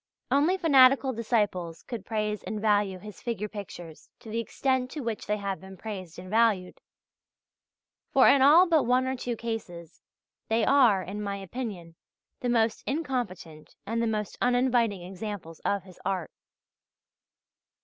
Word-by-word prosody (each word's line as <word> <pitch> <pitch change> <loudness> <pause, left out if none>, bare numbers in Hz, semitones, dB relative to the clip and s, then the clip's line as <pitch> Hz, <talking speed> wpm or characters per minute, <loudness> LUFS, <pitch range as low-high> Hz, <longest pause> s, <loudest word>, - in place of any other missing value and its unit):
Only 305 +7 +3
fanatical 270 -5 +5
disciples 205 -8 -1
could 225 -6 -7
praise 210 -1 -2
and 215 - -5
value 205 -3 +2
his 210 +2 -11
figure 220 -3 -3
pictures 175 -6 -9
to 220 - -10
the 230 - -1
extent 260 +2 -1
to 295 - -6
which 230 -4 -4
they 210 - 0
have 200 -2 -4
been 190 0 -11
praised 190 -6 -7
and 180 +1 -9
valued; 210 -3 +1 1.3
for 265 - +6
in 275 - +6
all 310 +7 +8
but 320 -6 +3
one 250 +2 +3
or 260 0 -1
two 245 -1 -3
cases, 190 -8 -6 0.5
they 220 0 +2
are, 245 -9 +4
in 200 +3 -6
my 200 -1 -3
opinion, 195 -4 -6 0.5
the 245 - -2
most 225 -2 +1
incompetent 240 - -4
and 230 +2 -1
the 230 - +1
most 215 -2 -3
uninviting 245 -6 +2
examples 185 -3 -7
of 200 -1 -1
his 185 -2 -16
art. 185 -4 -2
215 Hz, 150 wpm, -28 LUFS, 190-250 Hz, 1.3 s, all